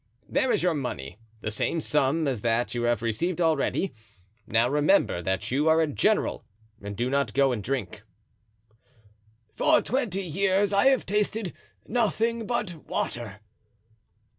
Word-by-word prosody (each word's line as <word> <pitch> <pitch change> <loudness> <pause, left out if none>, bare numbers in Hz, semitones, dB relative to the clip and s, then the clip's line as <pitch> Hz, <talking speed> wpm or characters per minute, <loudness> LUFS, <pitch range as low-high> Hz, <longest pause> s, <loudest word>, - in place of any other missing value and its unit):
there 260 - +1
is - - +1
your 180 -2 +3
money, 110 - -5 0.2
the 110 - -3
same 135 +9 -1
sum 150 +1 +1
as 125 -6 -1
that 115 +1 0
you 120 - -2
have 120 -1 0
received 165 +11 -1
already. 165 +3 +1 0.5
Now 115 +2 +3
remember 150 - +2
that 95 +4 -2
you 145 +5 +2
are 160 +1 +5
a 160 - +4
general 145 -9 0 0.4
and 100 0 -7
do 120 +2 0
not 135 -4 0
go 135 -1 +4
and 115 -4 -2
drink." 125 -4 -3 1.5
"For - - +4
twenty 225 -7 -1
years 195 +3 +1
I 200 +6 +4
have 270 -2 +3
tasted 210 -1 -1 0.3
nothing 230 0 0
but 180 -9 -3
water." 110 -4 -4
150 Hz, 145 wpm, -26 LUFS, 120-195 Hz, 1.5 s, are